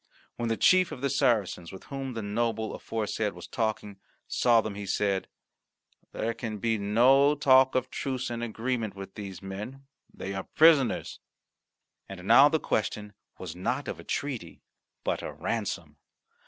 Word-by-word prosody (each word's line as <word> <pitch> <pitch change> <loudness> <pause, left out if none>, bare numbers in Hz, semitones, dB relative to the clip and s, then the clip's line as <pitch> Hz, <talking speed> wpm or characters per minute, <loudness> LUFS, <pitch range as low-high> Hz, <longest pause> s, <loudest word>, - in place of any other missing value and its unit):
When 120 -1 -2
the 115 - 0
chief 185 -1 +4
of 125 - -7
the 140 -1 0
Saracens, 100 -7 +1
with 95 - -10
whom 135 -2 -5
the 115 - -3
noble 110 +1 -1
aforesaid 110 -1 -2
was 90 - -10
talking, 110 -3 -3 0.3
saw 120 -2 +4
them, 110 -2 -2
he 100 0 -6
said, 100 0 0 0.8
"There 115 +1 -2
can 115 -2 -5
be 110 +1 0
no 130 +8 +4
talk 130 -2 +5
of 130 0 0
truce 130 -2 -3
and 120 0 -4
agreement 115 -2 -2
with 95 0 -9
these 100 -3 -8
men; 105 +8 -7 0.3
they 95 - -6
are 95 0 -5
prisoners." 155 -5 +4 0.9
And 95 -2 -9
now 135 +5 +8
the 160 - +1
question 105 -4 -2 0.2
was 90 -3 -7
not 90 - -2
of - - -5
a - - -10
treaty 140 -5 -4 0.4
but - - -1
a - - -5
ransom. - - -3
115 Hz, 160 wpm, -28 LUFS, 100-130 Hz, 0.9 s, now